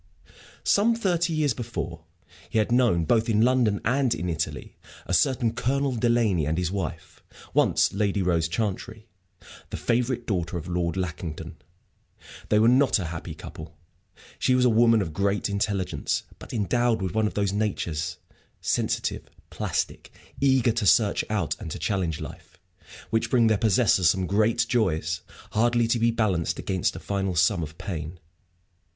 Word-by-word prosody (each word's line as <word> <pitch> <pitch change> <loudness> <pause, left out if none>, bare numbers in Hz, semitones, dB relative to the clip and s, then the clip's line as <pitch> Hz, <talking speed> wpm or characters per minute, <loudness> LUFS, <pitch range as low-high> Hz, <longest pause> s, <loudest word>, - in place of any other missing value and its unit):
Some 225 +3 +3
thirty 175 -6 0
years 155 -4 +1
before, 85 -9 -5 0.4
he 115 - -2
had 110 +2 +1
known, 120 -10 +3
both 115 +5 +2
in 110 0 +3
London 120 -5 +2
and 130 +1 +2
in 90 - -3
Italy, 80 -3 -4 0.3
a - - -3
certain 115 +6 +2
Colonel 135 +2 0
Delaney 115 -9 +2
and 80 +2 -1
his 90 -1 -1
wife, 95 -6 -5 0.3
once - - +3
Lady 100 -1 0
Rose 85 -2 +1
Chantrey, 110 +4 -3 0.6
the - - -5
favorite 120 0 0
daughter 90 -4 -2
of 85 - -7
Lord 85 -1 -1
Lackington. 85 -3 -5 0.9
They 105 - +4
were 110 +2 +5
not 130 +2 +4
a 95 - -3
happy 85 - -6
couple. 80 0 -10 0.6
She 130 - +3
was 125 0 +3
a 125 - +4
woman 115 -1 +4
of 80 -4 -6
great 100 +4 0
intelligence, 100 -2 -1 0.2
but - - -11
endowed 120 +1 +1
with 95 -3 -3
one 110 -1 +2
of - - -6
those 100 -2 0
natures 90 -5 -2 0.4
sensitive, - - -1 0.2
plastic, - - -3 0.3
eager 130 -3 +3
to 110 -3 -1
search 105 +1 +4
out 105 -7 -1
and - - -6
to - - -5
challenge 90 -6 -1
life 80 +3 -10 0.5
which 115 -1 +1
bring 120 -3 +4
their 110 -1 +4
possessors 105 -5 +3
some 95 +3 +1
great 110 +4 +2
joys, 85 -9 0 0.3
hardly 120 +1 +2
to 115 - +2
be 115 +1 +3
balanced 105 -8 0
against 95 -2 -1
a - - -6
final 95 -2 -2
sum 90 +1 +3
of 80 0 -7
pain. 85 -2 -6
105 Hz, 160 wpm, -25 LUFS, 90-120 Hz, 0.9 s, were